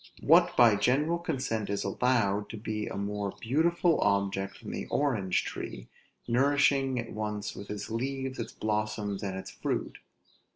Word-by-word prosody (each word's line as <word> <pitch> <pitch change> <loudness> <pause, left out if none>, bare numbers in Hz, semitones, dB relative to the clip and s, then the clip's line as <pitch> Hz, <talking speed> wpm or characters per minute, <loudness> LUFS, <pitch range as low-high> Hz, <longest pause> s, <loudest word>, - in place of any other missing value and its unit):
What - - +5
by 115 -4 +7
general 150 +10 +2
consent 130 - -2
is 100 - -1
allowed 105 -1 +1
to 110 - -6
be 105 0 -3
a - - -5
more 100 0 -3
beautiful 165 +7 +2
object 100 -1 0
than - - -6
an - - -4
orange 110 -11 +1
tree, - - -6 0.4
nourishing 135 +1 +3
at 115 -1 -4
once 105 -1 -3
with 100 - -9
its 105 +1 -5
leaves, 130 +2 -3
its 115 - -4
blossoms, 105 -2 -2
and 95 -2 -3
its 95 - -7
fruit? - - -3
110 Hz, 155 wpm, -29 LUFS, 100-135 Hz, 0.4 s, by